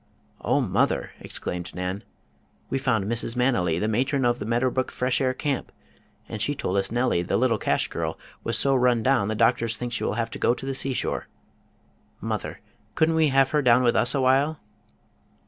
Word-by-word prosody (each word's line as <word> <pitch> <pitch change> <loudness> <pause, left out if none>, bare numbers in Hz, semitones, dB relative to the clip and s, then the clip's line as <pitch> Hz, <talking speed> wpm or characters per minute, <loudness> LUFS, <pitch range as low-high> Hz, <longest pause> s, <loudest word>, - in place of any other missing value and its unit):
"Oh, - - +2
mother!" - - 0
exclaimed 90 0 -5
Nan, 90 +2 -4 0.7
"we 135 - 0
found 115 -7 0
Mrs. 115 +2 -2
Manily, 120 -10 +1
the 105 - -1
matron 130 +4 0
of 120 0 +1
the 105 - -5
Meadow 120 +2 +1
Brook 130 0 -1
Fresh 125 +1 0
Air 130 -1 +1
Camp, 140 -2 -2 0.6
and - - -6
she - - 0
told 95 - -2
us 95 +1 -1
Nellie, 120 -7 +1
the 90 - 0
little 115 -3 +2
cash - - +1
girl, - - -4 0.3
was 115 -1 0
so 135 +4 +2
run 125 -3 +3
down 130 -5 +2
the 110 - -2
doctors 115 0 +2
think 120 -1 -5
she - - -2
will - - -1
have 115 0 -2
to - - -7
go 120 - +2
to - - -8
the 135 - -2
seashore. 135 -1 -1 0.9
Mother, - - -4 0.3
couldn't 160 +1 +3
we 160 -1 +3
have 135 -1 +3
her 150 - +2
down 125 -1 +4
with 120 - +3
us 125 +2 +3
awhile?" 135 +4 +2
125 Hz, 195 wpm, -25 LUFS, 110-135 Hz, 0.9 s, down